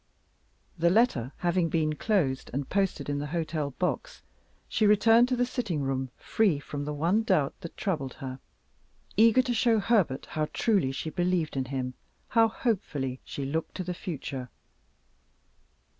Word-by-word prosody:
The 170 Hz, +1 st, +4 dB
letter 175 Hz, -, +2 dB
having 175 Hz, -1 st, +1 dB
been 155 Hz, -2 st, +1 dB
closed, 150 Hz, -8 st, 0 dB
and 140 Hz, +1 st, -2 dB
posted 195 Hz, -1 st, 0 dB
in 145 Hz, 0 st, -1 dB
the 145 Hz, -, -3 dB
hotel 155 Hz, -2 st, -2 dB
box, 340 Hz, -, -2 dB, 0.4 s
she 215 Hz, -, +2 dB
returned 225 Hz, +3 st, +6 dB
to 255 Hz, -, +2 dB
the 245 Hz, 0 st, +2 dB
sitting 210 Hz, -, -2 dB
room 135 Hz, -1 st, -1 dB
free 205 Hz, -9 st, +2 dB
from 145 Hz, 0 st, -5 dB
the 150 Hz, -, -3 dB
one 170 Hz, +9 st, +2 dB
doubt 185 Hz, -11 st, +2 dB
that 170 Hz, -, -7 dB
had -, -, -39 dB
troubled 155 Hz, -, -2 dB
her; 130 Hz, -1 st, -7 dB, 0.8 s
eager 230 Hz, +4 st, +6 dB
to 250 Hz, -1 st, -1 dB
show 230 Hz, 0 st, +3 dB
Herbert 200 Hz, -, +1 dB
how 155 Hz, -1 st, -1 dB
truly 200 Hz, -, +2 dB
she 155 Hz, +4 st, -4 dB
believed 175 Hz, -3 st, 0 dB
in 135 Hz, -1 st, -1 dB
him, 130 Hz, -1 st, -3 dB, 0.4 s
how 225 Hz, -1 st, +5 dB
hopefully 155 Hz, -, -2 dB
she 140 Hz, -, -5 dB
looked 160 Hz, +4 st, -3 dB
to 185 Hz, -, -3 dB
the 180 Hz, 0 st, -3 dB
future. 135 Hz, -7 st, -5 dB
170 Hz, 160 wpm, -28 LUFS, 140-215 Hz, 0.8 s, returned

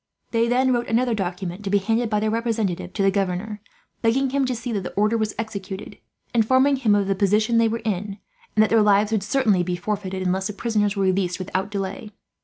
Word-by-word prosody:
They 230 Hz, 0 st, +2 dB
then 255 Hz, +2 st, +2 dB
wrote 240 Hz, -1 st, -1 dB
another 240 Hz, +1 st, +1 dB
document, 185 Hz, -1 st, -4 dB
to 195 Hz, -, -3 dB
be 205 Hz, -, +3 dB
handed 225 Hz, +4 st, 0 dB
by 210 Hz, -1 st, +1 dB
their 215 Hz, 0 st, 0 dB
representative 220 Hz, -6 st, -1 dB
to 200 Hz, -, -1 dB
the 195 Hz, -, +4 dB
governor, 195 Hz, +2 st, -2 dB, 0.4 s
begging 255 Hz, +4 st, +2 dB
him 275 Hz, 0 st, +1 dB
to 255 Hz, -1 st, -1 dB
see 235 Hz, +1 st, -5 dB
that 205 Hz, -3 st, -1 dB
the 180 Hz, -, -6 dB
order 210 Hz, +3 st, +2 dB
was 220 Hz, -1 st, -1 dB
executed, 205 Hz, -3 st, -6 dB, 0.3 s
informing 260 Hz, +4 st, +3 dB
him 220 Hz, -6 st, +3 dB
of 200 Hz, -1 st, +2 dB
the 195 Hz, -, +1 dB
position 210 Hz, +4 st, +2 dB
they 230 Hz, -, +4 dB
were 230 Hz, +1 st, -3 dB
in, 200 Hz, -1 st, -2 dB, 0.4 s
and 215 Hz, -, +5 dB
that 215 Hz, -, 0 dB
their 225 Hz, -1 st, +5 dB
lives 205 Hz, 0 st, +3 dB
would 220 Hz, -3 st, +1 dB
certainly 215 Hz, -3 st, +2 dB
be 175 Hz, 0 st, -1 dB
forfeited, 190 Hz, 0 st, -3 dB
unless 190 Hz, +1 st, 0 dB
the 210 Hz, -, -5 dB
prisoners 210 Hz, -1 st, 0 dB
were 195 Hz, -, 0 dB
released 185 Hz, -1 st, +1 dB
without 190 Hz, +1 st, -3 dB
delay. 200 Hz, +1 st, -4 dB
210 Hz, 220 wpm, -23 LUFS, 195-230 Hz, 0.4 s, and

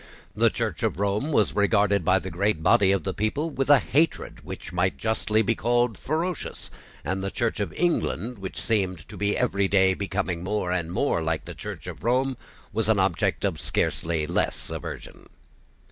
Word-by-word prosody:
The -, -, +4 dB
Church -, -, -3 dB
of -, -, -1 dB
Rome 100 Hz, +9 st, 0 dB
was 110 Hz, -8 st, +3 dB
regarded 100 Hz, -2 st, +3 dB
by 95 Hz, +3 st, +4 dB
the 95 Hz, 0 st, -5 dB
great 90 Hz, -1 st, 0 dB
body 95 Hz, +2 st, +5 dB
of 100 Hz, -, +1 dB
the 95 Hz, -, -2 dB
people 140 Hz, +10 st, -1 dB
with 135 Hz, -1 st, -2 dB
a 145 Hz, -, +9 dB
hatred 150 Hz, +5 st, 0 dB
which -, -, -8 dB
might 90 Hz, +1 st, +1 dB
justly 110 Hz, -1 st, +1 dB
be 110 Hz, +2 st, +2 dB
called 120 Hz, 0 st, +1 dB
ferocious; 165 Hz, -, -3 dB, 0.3 s
and 95 Hz, +4 st, -1 dB
the 100 Hz, -, -1 dB
Church 115 Hz, +2 st, -1 dB
of 100 Hz, -, -2 dB
England, 125 Hz, -, -1 dB
which 95 Hz, -1 st, -5 dB
seemed 95 Hz, -7 st, -1 dB
to -, -, -9 dB
be 100 Hz, 0 st, 0 dB
every 100 Hz, -5 st, +1 dB
day 95 Hz, -1 st, +4 dB
becoming 95 Hz, -3 st, -2 dB
more 95 Hz, -2 st, -1 dB
and 85 Hz, -2 st, -1 dB
more 115 Hz, -2 st, +1 dB
like 80 Hz, 0 st, -2 dB
the -, -, -7 dB
Church -, -, -7 dB
of -, -, -8 dB
Rome, 130 Hz, +3 st, +1 dB, 0.4 s
was 110 Hz, 0 st, 0 dB
an 110 Hz, -, +4 dB
object 95 Hz, -3 st, +1 dB
of -, -, -1 dB
scarcely 80 Hz, -2 st, 0 dB
less -, -, -1 dB
aversion. -, -, -7 dB
100 Hz, 185 wpm, -26 LUFS, 95-120 Hz, 0.4 s, a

